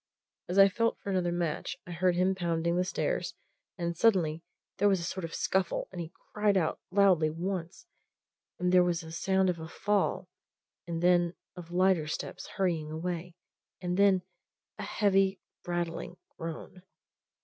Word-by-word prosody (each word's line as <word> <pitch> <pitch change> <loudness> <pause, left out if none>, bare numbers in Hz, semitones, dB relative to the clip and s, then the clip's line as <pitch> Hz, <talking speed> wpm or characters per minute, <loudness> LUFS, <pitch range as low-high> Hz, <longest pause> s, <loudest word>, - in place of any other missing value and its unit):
As 180 - -1
I 195 0 +9
felt 230 +4 0
for 200 - -5
another 180 -2 +1
match, 175 0 -2
I 180 - -9
heard 175 +1 +2
him 185 +2 +3
pounding 170 -2 0
the 180 - +2
stair - - -1 0.6
and 170 -1 -2
suddenly 170 -6 +3 0.4
there 205 +1 +5
was 195 -2 +3
a - - -5
sort 185 +2 -4
of 165 - -5
scuffle 190 -3 0
and 180 -2 -5
he 165 0 -7 0.2
cried 210 -1 +3
out 165 -4 0
loudly 185 -5 +4
once, 175 - -4 0.7
and 180 0 +1
there 180 -1 +6
was 175 -1 0
the 160 -1 -10
sound 190 +3 +1
of 175 -2 0
a 160 - -6
fall, 200 +1 0 0.6
and 165 0 -3
then 175 -1 +4 0.2
of 175 -2 -9
lighter 180 -3 +3
steps 155 - -5
hurrying 170 -6 0
away, 170 +2 -4 0.4
and 180 -1 -2
then 195 -1 +4 0.6
a - - -3
heavy, 195 -2 +2 0.3
rattling 175 0 -3 0.2
groan. 165 +2 -7
180 Hz, 160 wpm, -30 LUFS, 170-190 Hz, 0.7 s, I